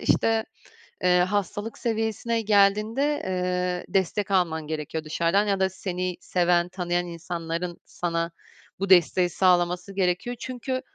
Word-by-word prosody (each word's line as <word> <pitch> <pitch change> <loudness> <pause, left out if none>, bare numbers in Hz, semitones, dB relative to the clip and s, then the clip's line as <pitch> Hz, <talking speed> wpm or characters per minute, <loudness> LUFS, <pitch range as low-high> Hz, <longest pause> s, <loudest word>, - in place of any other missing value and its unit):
işte, 225 0 +2 0.6
eee, 180 0 +5
hastalık 205 +3 -1
seviyesine 225 0 -1
geldiğinde, 215 +7 +2
eee, 180 -1 -1
destek 195 +2 0
alman 165 -5 +1
gerekiyor 155 0 -4
dışarıdan 170 +6 +1
ya 195 -1 +1
da 190 0 +2
seni 185 -1 -4
seven, 175 -1 +2
tanıyan 175 -1 -1
insanların 170 0 -4
sana 170 -1 -2 0.5
bu 195 0 -2
desteği 180 0 +5
sağlaması 180 +1 +2
gerekiyor. 190 +6 0
Çünkü 255 +1 -4
180 Hz, 120 wpm, -25 LUFS, 175-205 Hz, 0.6 s, eee